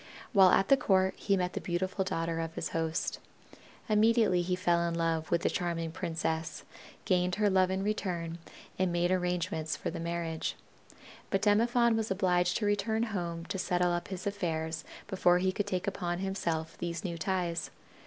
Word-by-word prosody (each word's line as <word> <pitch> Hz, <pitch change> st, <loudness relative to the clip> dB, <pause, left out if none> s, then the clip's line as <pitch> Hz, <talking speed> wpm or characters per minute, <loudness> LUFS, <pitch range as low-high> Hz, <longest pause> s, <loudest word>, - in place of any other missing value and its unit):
While 190 Hz, -3 st, +7 dB
at 195 Hz, +2 st, +3 dB
the 275 Hz, -, +7 dB
court 190 Hz, -6 st, +3 dB
he 200 Hz, -1 st, +1 dB
met 180 Hz, 0 st, -1 dB
the -, -, -3 dB
beautiful 185 Hz, +2 st, -1 dB
daughter 165 Hz, -2 st, -2 dB
of 165 Hz, 0 st, -4 dB
his -, -, -3 dB
host. 165 Hz, 0 st, -2 dB, 0.7 s
Immediately 215 Hz, -3 st, +4 dB
he 180 Hz, +1 st, 0 dB
fell 175 Hz, -2 st, +2 dB
in 170 Hz, -, -3 dB
love 165 Hz, -1 st, 0 dB
with 170 Hz, -1 st, +2 dB
the -, -, +3 dB
charming 170 Hz, -2 st, -2 dB
princess, 160 Hz, -2 st, -3 dB, 0.4 s
gained 180 Hz, -1 st, +2 dB
her 205 Hz, -1 st, +2 dB
love 185 Hz, -1 st, +4 dB
in 190 Hz, +1 st, -1 dB
return, 175 Hz, -5 st, -2 dB, 0.4 s
and 185 Hz, -1 st, +2 dB
made 175 Hz, +1 st, +1 dB
arrangements 180 Hz, -3 st, -1 dB
for -, -, -3 dB
the -, -, -5 dB
marriage. 165 Hz, -1 st, -2 dB, 0.7 s
But 195 Hz, 0 st, 0 dB
Demophon 235 Hz, +3 st, +4 dB
was 220 Hz, 0 st, -1 dB
obliged 180 Hz, -2 st, +2 dB
to 215 Hz, -, -1 dB
return 220 Hz, +2 st, +1 dB
home 170 Hz, -3 st, -3 dB
to 190 Hz, -, -4 dB
settle 180 Hz, -1 st, +1 dB
up 175 Hz, 0 st, -2 dB
his 190 Hz, -2 st, -6 dB
affairs 160 Hz, -5 st, -2 dB, 0.2 s
before 180 Hz, -3 st, +3 dB
he 185 Hz, +1 st, +1 dB
could 205 Hz, +2 st, -2 dB
take 185 Hz, -3 st, -1 dB
upon 175 Hz, -3 st, -2 dB
himself 170 Hz, -4 st, -2 dB
these 170 Hz, -1 st, -3 dB
new 170 Hz, -3 st, -4 dB
ties. 170 Hz, 0 st, -1 dB
180 Hz, 175 wpm, -31 LUFS, 170-195 Hz, 0.7 s, While